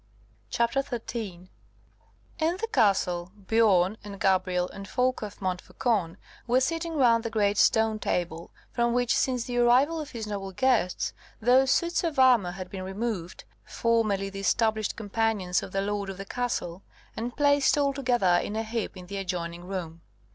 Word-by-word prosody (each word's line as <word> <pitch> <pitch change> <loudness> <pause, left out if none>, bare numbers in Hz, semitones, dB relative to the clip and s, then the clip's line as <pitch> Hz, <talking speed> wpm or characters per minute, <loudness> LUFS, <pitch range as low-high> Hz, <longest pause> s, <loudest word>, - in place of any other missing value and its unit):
CHAPTER 235 +2 +1
13 225 -8 -6 0.9
In 330 +3 +1
the 455 +3 -3
castle, 180 - +2
Biorn 205 -2 +3
and 200 -1 -9
Gabrielle 185 -2 +1
and 195 0 -9
Folko 250 -1 0
of 205 - -15
Montfaucon 190 0 -1 0.3
were 245 +2 +4
sitting 330 +4 -2
round 235 -5 +4
the 230 - -2
great 205 -2 +1
stone 220 -1 +3
table, 170 -4 -2 0.2
from 235 -1 +1
which, 245 0 +2
since 250 -3 +1
the 245 0 -2
arrival 260 +7 +4
of 300 - -7
his 230 -5 -6
noble 200 -2 -5
guests, 180 - +1 0.3
those 255 +3 +4
suits 340 +5 +1
of 325 -4 -2
armour 245 -9 +5
had 185 -1 -8
been 190 - -5
removed, 190 -2 -4 0.2
formerly 215 -4 0
the 195 - -7
established 220 +1 +1
companions 205 -4 0
of - - -8
the 195 - 0
lord 200 0 -2
of 190 - -6
the 195 - -7
castle, 195 -7 -3 0.3
and 235 +2 -5
placed 285 -1 +3
all 280 -1 +2
together 240 -10 +2
in 210 - -5
a 220 - -1
heap 225 -3 -4
in 180 - -9
the 200 +2 -6
adjoining 175 -2 -4
room. 170 -3 -6
215 Hz, 165 wpm, -27 LUFS, 190-245 Hz, 0.9 s, armour